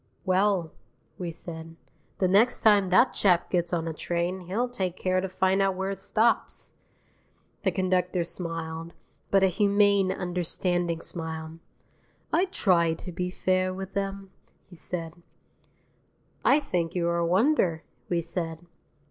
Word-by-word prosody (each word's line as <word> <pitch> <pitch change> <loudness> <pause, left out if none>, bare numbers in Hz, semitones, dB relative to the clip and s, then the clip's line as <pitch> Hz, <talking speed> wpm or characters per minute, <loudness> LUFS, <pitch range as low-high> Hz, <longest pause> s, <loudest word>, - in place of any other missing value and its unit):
"Well," 185 -3 +2 0.5
we 180 -2 -3
said, 165 0 -8 0.4
"the 185 - +2
next 210 +7 +3
time 205 -3 +5
that 215 +8 +5
chap 180 -4 +2
gets 175 -2 0
on 165 -2 -1
a 165 - -3
train 175 +3 -2
he'll 195 +8 -2
take 190 -8 -3
care 185 0 +1
to 190 - -3
find 190 +1 +2
out 195 -1 +2
where 190 +1 -2
it 195 - -5
stops." 225 +2 0 0.9
The - - +2
conductor 180 -2 0
smiled, 165 -1 -5 0.4
but 195 -1 +4
a - - +6
humane, 200 0 +3
understanding 175 -2 -1
smile. 160 -1 -6 0.7
"I 345 +4 +4
try 170 - +2
to 180 - -8
be 180 +1 -3
fair 185 0 0
with 190 0 -7
'em," 195 -1 -3 0.4
he - - -11
said. 165 -1 -5 1.3
"I 285 - +5
think 175 - -2
you 175 -1 0
were 170 0 +1
a 170 - +1
wonder," 185 - +2 0.3
we 175 -1 +1
said. 165 0 -4
180 Hz, 145 wpm, -27 LUFS, 170-195 Hz, 1.3 s, a